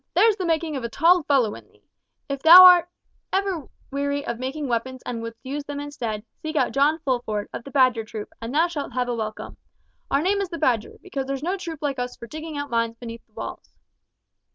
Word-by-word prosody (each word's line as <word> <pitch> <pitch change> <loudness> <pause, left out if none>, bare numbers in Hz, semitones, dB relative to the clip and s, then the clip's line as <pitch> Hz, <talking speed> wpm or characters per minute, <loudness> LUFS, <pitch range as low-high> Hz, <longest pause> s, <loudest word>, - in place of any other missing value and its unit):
There's 445 -2 +5
the 375 -4 -3
making 320 -2 0
of 265 - -4
a 235 - -3
tall 340 +8 +4
fellow 270 -8 +2
in - - -12
thee! - - -29 0.4
If 275 -1 -3
ever - - -28
thou 345 +4 +11 1.0
art 285 - -15 0.2
weary 285 +1 -2
of 235 - -4
making 270 +3 -3
weapons 250 +2 -3
and 235 -2 -4
wouldst 230 +1 -9
use 285 +2 -4
them 290 -1 -5
instead, 235 -7 -5 0.2
seek 315 0 -5
out - - +2
John 285 +3 +3
Fulford, 240 -6 -1
of - - -6
the - - -8
Badger 255 -4 +3
troop, 220 -1 -8
and 230 +1 -5
thou 315 +5 +3
shalt 295 -7 -5
have 250 0 -1
a - - 0
welcome. 215 -2 -5 0.5
Our 280 +2 +1
name 400 +2 +1
is 390 - -3
the 335 - -5
Badger, 245 -8 0
because 275 -9 -4
there's 275 0 -3
no 360 +4 0
troop 330 -5 -7
like 275 -3 -1
us 245 0 -4
for - - -9
digging 310 +4 -7
out 285 -2 -5
mines 230 0 0
beneath 230 -1 -8
the 220 - -39
walls." 225 - -8
275 Hz, 225 wpm, -24 LUFS, 235-310 Hz, 1.0 s, thou